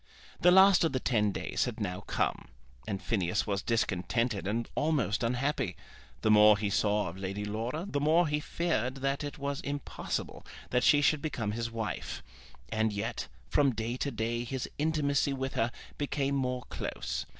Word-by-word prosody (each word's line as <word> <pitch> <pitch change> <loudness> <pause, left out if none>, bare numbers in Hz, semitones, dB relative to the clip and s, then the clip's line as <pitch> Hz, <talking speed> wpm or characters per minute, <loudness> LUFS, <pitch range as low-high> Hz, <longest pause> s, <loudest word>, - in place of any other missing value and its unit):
The 180 - +6
last 190 0 +7
of 160 - +1
the 130 - +1
ten 105 -5 +2
days - - -1
had 120 -3 -5
now 90 -4 -2
come, - - -1 0.4
and 100 -3 -2
Phineas 95 -5 0
was 100 -2 -1
discontented 115 0 0
and 115 +3 -1
almost 145 -9 +1
unhappy. 125 +5 0 0.5
The 110 - +3
more 105 0 +7
he 100 -1 -1
saw 105 0 +2
of 85 +3 -7
Lady 100 +2 -3
Laura 115 - -3
the 145 - -1
more 160 +4 +4
he 150 0 0
feared 150 -6 -1
that 135 +2 -1
it 145 - -5
was 140 -1 -3
impossible 145 0 -4 0.3
that 125 0 +2
she 145 - +6
should 150 0 +3
become 115 -9 -2
his 115 +1 -2
wife. 115 -1 -4 0.5
And 110 0 +1
yet 100 -9 -3 0.2
from 140 -4 +3
day 115 +2 -2
to 140 - -1
day 115 -1 -2
his 125 +1 -3
intimacy 145 -2 +1
with 135 0 -3
her 115 +1 +1 0.3
became 140 -1 0
more 125 -2 -1
close. - - -4
125 Hz, 170 wpm, -30 LUFS, 105-145 Hz, 0.5 s, last